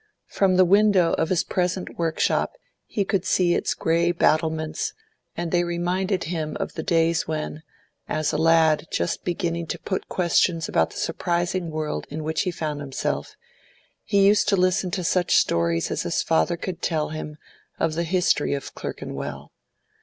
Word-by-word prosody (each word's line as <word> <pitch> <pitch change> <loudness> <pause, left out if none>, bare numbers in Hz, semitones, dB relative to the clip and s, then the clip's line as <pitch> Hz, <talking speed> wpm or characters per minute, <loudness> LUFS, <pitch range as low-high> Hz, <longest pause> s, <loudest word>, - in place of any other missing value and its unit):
From 190 -2 +1
the 185 0 +6
window 195 -2 +4
of 160 - +1
his 185 - +2
present 180 0 -2
workshop 165 - +1 0.3
he 200 - -1
could 190 -2 0
see 180 -2 +2
its - - 0
grey 170 +1 +2
battlements, 155 -2 0 0.4
and 170 -1 -3
they 175 -1 +3
reminded 180 +2 -1
him 155 -2 -3
of - - -3
the - - -4
days 165 0 +1
when, 155 0 -4 0.5
as 155 -1 0
a - - +1
lad 165 -1 +4
just 85 - -1
beginning 170 -1 -2
to - - -3
put 190 - -4
questions 170 -1 +2
about 80 - +2
the - - -11
surprising 175 0 -1
world 155 -1 -3
in 155 +2 -5
which 160 0 -1
he - - -1
found 155 -4 -4
himself, 135 -2 -3 0.7
he 200 -2 +3
used 205 +1 +4
to 200 - +4
listen 185 +1 +2
to 180 +1 -3
such 175 +1 +2
stories 85 0 +2
as - - -1
his - - -1
father 80 - +1
could 175 -1 -5
tell 155 -3 0
him 155 -1 -6 0.4
of 160 - +1
the 170 +2 -1
history 170 -4 +1
of 140 - -7
Clerkenwell. 70 +1 -6
170 Hz, 170 wpm, -24 LUFS, 155-180 Hz, 0.7 s, the